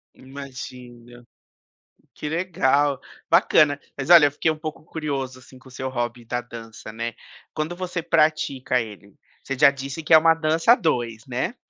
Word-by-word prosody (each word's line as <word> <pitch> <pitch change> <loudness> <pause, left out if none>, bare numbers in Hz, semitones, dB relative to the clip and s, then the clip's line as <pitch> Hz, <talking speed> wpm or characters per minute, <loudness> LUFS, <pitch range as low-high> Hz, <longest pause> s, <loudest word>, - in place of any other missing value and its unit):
Imagino, 125 -3 -11 0.9
que 150 - -6
legal, 145 -5 +1 0.3
bacana, 145 -2 +4 0.2
mas 140 +1 -5
olha 170 -4 +9
eu 145 - +2
fiquei 155 +3 0
um 155 - -5
pouco 155 0 -7
curioso, 140 -5 -4
assim, 130 0 -16
com 130 +1 -17
o - - -18
seu 130 +1 -5
hobby 120 -1 -4
da 120 +2 -3
dança, 115 -2 -10
né. 115 +1 -4 0.4
Quando 155 +2 -3
você 180 -1 -4
pratica 155 -6 +1
ele, 105 -3 -11 0.3
você 135 - -5
já 140 +1 +6
disse, 140 +3 -7
que 155 - +2
é - - +11
uma 165 +1 +5
dança 160 +6 +3
a - - +4
2, 120 - -2
né. 130 - -3
140 Hz, 170 wpm, -23 LUFS, 125-155 Hz, 0.9 s, é